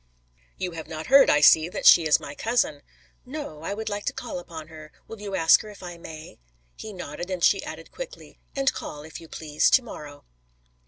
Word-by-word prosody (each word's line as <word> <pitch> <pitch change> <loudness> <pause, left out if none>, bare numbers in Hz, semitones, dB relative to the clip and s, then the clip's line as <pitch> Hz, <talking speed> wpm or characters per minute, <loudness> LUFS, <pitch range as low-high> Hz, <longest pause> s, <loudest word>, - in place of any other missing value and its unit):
"You 180 -1 -3
have 165 -1 -8
not 160 0 -6
heard, 275 0 +8
I 150 - +4
see, 155 +3 +6
that - - -6
she 165 -2 +8
is 150 - +5
my 140 - -8
cousin." 220 -7 0 0.4
"No. 255 - -7
I 195 +5 -4
would 220 +1 -6
like 205 -1 -3
to - - -1
call - - -5
upon 160 -3 -9
her. 155 -1 -12 0.2
Will 225 -2 -10
you 200 -2 -4
ask 165 -2 +6
her 215 - -10
if 205 -2 -13
I 175 -1 -8
may?" 160 - -10 0.4
He 220 - -8
nodded 180 -2 -7
and 185 -2 -3
she - - +4
added - - -9
quickly, - - -10 0.2
"And 275 0 +2
call, 150 0 -7
if 160 +2 -10
you 165 - -12
please, 150 -2 0
to 260 - +5
morrow." 145 -10 -10
170 Hz, 215 wpm, -25 LUFS, 155-210 Hz, 0.4 s, heard